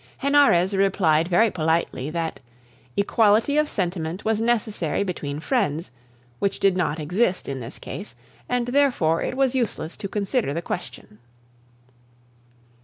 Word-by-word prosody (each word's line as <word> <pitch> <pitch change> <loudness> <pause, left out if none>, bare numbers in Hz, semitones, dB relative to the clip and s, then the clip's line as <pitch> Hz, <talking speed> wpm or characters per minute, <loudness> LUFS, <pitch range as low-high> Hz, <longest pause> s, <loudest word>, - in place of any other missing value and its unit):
Henarez 275 -10 +4
replied 180 -5 +2
very 210 +5 +3
politely 160 -5 -1
that 165 0 -3 0.6
equality 215 +6 +3
of 300 0 +2
sentiment 175 -1 -3
was 220 0 +1
necessary 215 -7 0
between 150 -6 -4
friends, 170 - -1 0.5
which 200 - -1
did 195 -2 +3
not 165 -4 -1
exist 185 +5 0
in 135 -1 -4
this 115 -1 -7
case, 200 - -8 0.3
and 245 -1 0
therefore 245 - +2
it 255 - -3
was 270 -2 +2
useless 230 -10 -2
to 210 - -4
consider 200 - -1
the 170 - -1
question. 105 -8 -7
190 Hz, 130 wpm, -24 LUFS, 160-230 Hz, 0.6 s, Henarez